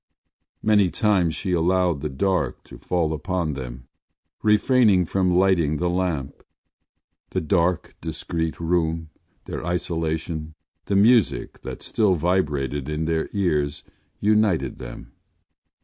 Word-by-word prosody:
Many 105 -4 +4
times 90 -3 +1
she 95 - -3
allowed 90 -2 +2
the 75 - -2
dark 90 +6 -1
to - - -13
fall 85 -3 0
upon 85 0 -2
them, 60 -2 -7 0.5
refraining 105 -3 +4
from 90 +2 +1
lighting 90 -5 +3
the 90 +2 0
lamp. 85 -7 -2 0.9
The - - -1
dark 85 +1 +1
discreet 80 0 -3
room, 80 -1 -1 0.3
their - - -5
isolation, 80 -2 -3 0.3
the 100 - -1
music 110 +1 +3
that - - -7
still 105 -5 +2
vibrated 75 -5 0
in 75 +1 -2
their 80 0 -1
ears 75 -7 0 0.4
united 105 - +2
them. - - -9
85 Hz, 115 wpm, -23 LUFS, 75-95 Hz, 0.9 s, Many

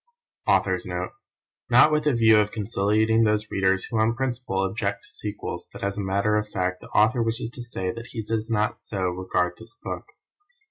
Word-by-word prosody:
AUTHOR'S - - +2
NOTE - - -3 0.6
Not 155 - +7
with 150 0 +1
a 150 - +4
view 110 -2 +6
of 105 0 +1
conciliating 110 +1 +2
those 105 0 +1
readers 95 0 +2
who 115 - -2
on 110 +2 +2
principle 125 -5 -2
object 100 0 -2
to - - -15
sequels, 105 -10 -5
but - - -9
as 100 0 -1
a 105 - -3
matter 100 +2 +1
of 105 0 -2
fact, 95 -2 -2
the - - -11
Author 115 +3 +3
wishes 115 0 -1
to 125 - -8
say 95 -6 -3
that 115 +2 -8
he 110 - -5
does 110 +1 -2
not 110 -1 0
so 95 -3 -2
regard 90 0 -1
this 115 +3 -12
book. - - -5
105 Hz, 195 wpm, -25 LUFS, 100-115 Hz, 0.6 s, Not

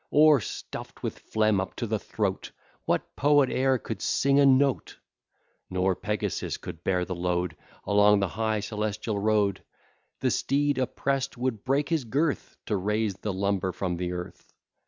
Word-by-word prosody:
Or, 150 -1 +6
stuff'd - - -7
with - - -4
phlegm 110 -3 +1
up 95 - -6
to 120 - -3
the 110 -1 -1
throat, 100 -3 -2 0.4
What - - -1
poet 145 -2 +4
e'er 130 0 +2
could - - -6
sing 140 +1 +2
a 140 - +6
note? 135 0 +2 0.7
Nor 95 +1 +1
Pegasus 105 +1 -2
could 80 - -9
bear 90 -1 +1
the 90 - -4
load 90 -1 -1 0.3
Along 105 0 +5
the 95 -2 0
high 110 +3 -1
celestial 105 0 -2
road; 105 -2 +1 0.6
The - - +1
steed, 145 0 +1
oppress'd, 135 +1 -1
would 120 -4 -2
break 140 +2 +1
his 160 -6 0
girth, 145 +6 -1
To 105 - 0
raise 105 +2 0
the 105 - -3
lumber 95 -1 0
from 90 -1 -3
the 90 0 -2
earth. 90 0 -8
105 Hz, 160 wpm, -27 LUFS, 95-130 Hz, 0.7 s, Or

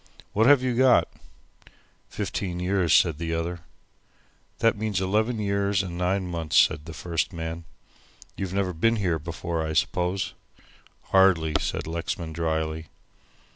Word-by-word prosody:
"What 110 +3 +3
have 140 -2 +6
you 125 -2 0
got!" 130 0 +5 1.0
"Fifteen 90 -3 -3
years," 90 -1 +1
said 80 -4 +4
the 85 0 -2
other. 85 +1 -3 1.0
"That 115 - +3
means 105 -2 -1
11 110 +5 0
years 100 -1 0
and 90 -2 -6
9 90 +2 0
months," 85 -3 -1
said 75 - +4
the 85 - -8
first 85 -2 -2
man. 80 -1 -5 0.7
"You've 95 -2 -4
never 95 -1 -1
been 115 +8 +2
here 90 -7 0
before, 85 +1 -4
I 80 0 -3
suppose?" 90 +4 0 0.8
"Hardly," 95 -5 +4
said - - -3
Lexman, 85 0 -4
drily. 80 -1 -2
90 Hz, 135 wpm, -25 LUFS, 80-100 Hz, 1.0 s, have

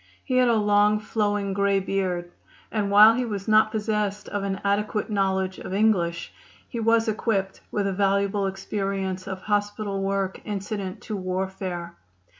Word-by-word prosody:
He 255 -2 0
had 250 -1 +5
a 235 - +4
long, 210 0 +3
flowing 205 -2 -1
grey 200 0 +2
beard, 185 -3 -2 0.4
and 210 -2 -1
while 210 +2 +8
he 250 +2 0
was 205 -4 -4
not 215 0 +5
possessed 210 -2 -2
of 205 - -2
an 195 -1 -2
adequate 210 +2 0
knowledge 190 -2 0
of 190 - -5
English, 175 -6 +1 0.3
he 235 - -5
was 230 +1 +3
equipped 205 -3 -1
with 205 -1 -1
a 195 - 0
valuable 200 +1 +1
experience 195 -1 -3
of 190 -1 -5
hospital 205 -1 -1
work 195 -1 -1
incident 200 -2 -4
to 215 - -5
warfare. 185 - -4
200 Hz, 155 wpm, -25 LUFS, 190-210 Hz, 0.4 s, while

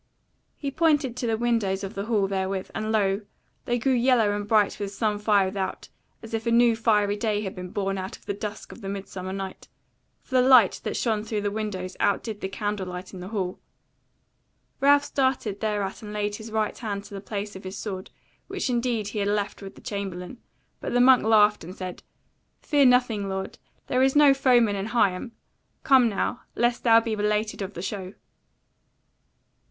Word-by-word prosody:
He 280 -2 -4
pointed 295 -5 +2
to 245 - -2
the 225 -1 +1
windows 220 -5 0
of 195 - -5
the 200 +1 -4
hall 215 -4 +1
therewith, 190 -1 -2
and 215 0 -2
lo! 200 -2 +1 0.4
they 240 - 0
grew 260 +3 +1
yellow 240 -4 +3
and 205 0 -4
bright 210 -2 +2
with 200 -1 -3
some 210 0 -1
fire 205 -2 +3
without, 190 0 -4 0.3
as 225 - -10
if 225 +1 -2
a - - +2
new 235 0 +5
fiery 210 -3 +2
day 210 -1 -1
had 190 - -4
been 180 0 -7
born 195 0 -2
out 185 +1 -6
of - - -26
the - - -2
dusk 210 +1 -6
of - - -12
the 195 -1 -4
summer 185 0 -6
night; 195 -1 -6 0.6
for - - -14
the 255 - +5
light 250 -5 +6
that - - -2
shone 220 -3 0
through 215 -1 -2
the 205 0 -1
windows 200 -4 -4
out 200 -1 +2
did 215 -3 -6
the 190 - -3
candle 205 -1 -3
light 180 +2 -7
in 185 - -8
the 180 - -7
hall. 190 -4 -3 1.2
Ralph 285 +1 +5
started 260 -7 0
thereat 205 -2 -2
and 210 -1 -8
laid 210 0 -2
his 220 0 -9
right 215 -1 0
hand 200 -3 -4
to 205 0 -13
the 195 - -6
place 205 0 -5
of 190 - -9
his 190 +1 -6
sword, 190 -3 -5 0.4
which 380 -9 -2
indeed 235 -4 0
he 210 - -4
had 200 - 0
left 205 0 -1
with 195 -1 -9
the - - -15
chamberlain; 195 +2 -5 0.4
but - - -4
the 245 - +3
monk 255 0 +6
laughed 210 -2 +4
and 180 +3 -9
said: 185 -2 -6 0.6
"Fear 290 -2 +3
nothing, 245 -5 +2
lord; 190 0 -5 0.3
there 255 - +1
is 265 +1 +3
no 290 -2 +7
foeman 245 -6 +3
in 195 +1 -3
Higham: 225 0 +1 0.5
come 260 -5 +5
now, 220 +4 -2
lest 240 0 +1
thou 230 -1 +7
be 230 -1 -3
belated 210 0 -1
of 195 +1 -5
the 175 - -5
show." 190 -1 -5
210 Hz, 200 wpm, -26 LUFS, 195-235 Hz, 1.2 s, no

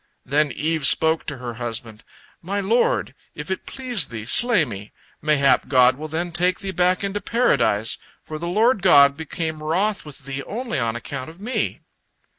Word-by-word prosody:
Then 145 +2 +1
Eve 155 0 0
spoke 160 0 +2
to 145 - -4
her 125 -1 -6
husband: 115 -1 -5 0.4
"My 195 +4 -3
lord, 235 - +1 0.2
if - - -7
it 190 - -4
please 250 - -1
thee, 110 -2 -7
slay 220 - +6
me. 105 -4 -9 0.3
Mayhap 145 -3 +2
God 130 -1 +4
will 155 +3 -7
then 170 +3 -3
take 180 +2 +1
thee 195 -1 -4
back 180 +1 +1
into 200 +1 -3
Paradise, 115 - +1 0.2
for 155 0 -7
the 170 - -4
Lord 220 +5 +2
God 140 -6 +6
became 160 0 -5
wroth 190 +7 -1
with 145 -3 -13
thee 140 0 -5
only 240 - -3
on 115 -2 -1
account 130 +3 -6
of 165 +3 -15
me." 230 +6 -3
160 Hz, 175 wpm, -22 LUFS, 135-195 Hz, 0.4 s, slay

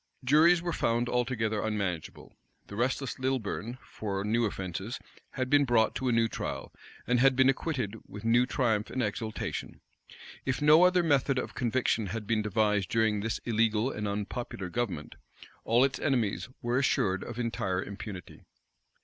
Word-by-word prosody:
Juries 165 +6 +5
were 175 -1 -2
found 120 +1 +1
altogether 115 -3 0
unmanageable. 100 -7 -3 0.3
The 100 - -9
restless 125 +3 -1
Lilburn, 130 -2 -2
for 100 -2 -4
new 115 +3 +1
offences, 95 +3 -4 0.4
had 130 -1 -2
been 145 +2 +4
brought 120 -4 +3
to 130 - -2
a - - +3
new 115 -1 +3
trial; - - -5 0.3
and 125 0 +2
had 135 +1 +5
been 130 +1 +5
acquitted 130 -7 -1
with 105 +2 -9
new 120 +2 +4
triumph 110 -6 0
and 130 - -1
exultation. 110 +1 -4 0.6
If 135 -2 -1
no 155 +4 +7
other 180 -1 +4
method 140 -3 +2
of 130 - -3
conviction 120 -3 0
had 110 +2 -4
been 110 +1 +1
devised 105 -2 +1
during 110 -2 +2
this 110 +2 -2
illegal 115 +1 +1
and 105 0 -3
unpopular 100 -1 -4
government, 95 -8 -3 0.5
all 120 +3 +4
its 135 0 0
enemies 120 -5 0
were 120 +2 +1
assured 95 -8 +1
of 120 - -7
entire 95 -6 -1
impunity. 100 -2 -8
115 Hz, 160 wpm, -29 LUFS, 105-130 Hz, 0.6 s, no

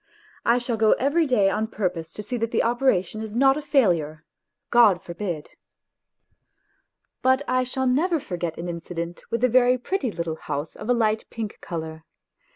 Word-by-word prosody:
I 235 +1 +4
shall 240 -2 -2
go 220 -1 +5
every 295 +5 +1
day 225 -7 +3
on 220 +1 -1
purpose 180 -7 -3
to 210 - -6
see 245 +4 -4
that 230 0 -1
the - - +1
operation 230 -5 +1
is 220 -1 -6
not 270 +2 +5
a 300 - -3
failure. 175 - +1 0.5
God 220 -7 +6
forbid! 170 -3 -5 1.7
But 260 +2 +3
I 255 0 +2
shall 260 +1 -2
never 315 +7 +2
forget 175 - -4
an 170 - -5
incident 170 0 -5
with 230 +1 -2
a - - +6
very 250 +1 +4
pretty 260 - -2
little 170 -4 -4
house 145 +1 -5
of 220 - -8
a - - +5
light 220 -2 +1
pink 220 -3 -6
colour. 160 -2 -6
220 Hz, 170 wpm, -24 LUFS, 175-255 Hz, 1.7 s, God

